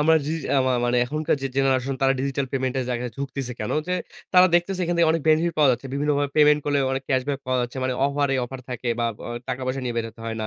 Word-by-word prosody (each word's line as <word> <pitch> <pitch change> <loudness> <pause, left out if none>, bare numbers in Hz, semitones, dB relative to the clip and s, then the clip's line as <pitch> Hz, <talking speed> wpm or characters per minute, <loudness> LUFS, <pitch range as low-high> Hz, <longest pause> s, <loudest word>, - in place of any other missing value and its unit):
আমার 160 +2 +5
জি - - -2
যে - - -5
আমা 130 -1 +2
মানে 125 - +2
আমার 120 0 0
এখনকার 155 +4 -1
যে 135 - 0
জেনারেশন 135 0 +1
তারা 135 0 +4
ডিজিটাল 135 0 -1
পেমেন্ট 130 -1 -1
এর - - -2
জায়গায় 125 0 -2
ঝুকতেছে 135 -2 -4
কেন? 105 - -2 0.2
যে 180 - +1 0.4
তারা 180 0 +8
দেখতেছে 180 +2 +1
এখান 175 +1 -1
থেকে 170 -1 +4
অনেক 165 -2 -1
বেনিফিট 160 +2 +3
পাওয়া 145 -3 +6
যাচ্ছে। 125 - -4
বিভিন্নভাবে 145 0 0
পেমেন্ট 150 0 +5
করলে 145 -1 +1
অনেক 135 0 -2
ক্যাশব্যাক 135 +1 0
পাওয়া 130 0 +1
যাচ্ছে। 120 +1 -4
মানে 130 0 0
অফার 140 0 0
এ - - +2
অফার 130 +1 -8
থাকে 125 0 -4
বা - - +1 0.2
অ - - -5 0.2
টাকা 125 - -3
পয়সা 130 +1 -2
নিয়ে 120 -1 -2
বেরোতে 115 -1 -4
হয় 115 0 -3
না। 110 - -2
135 Hz, 260 wpm, -24 LUFS, 125-150 Hz, 0.4 s, তারা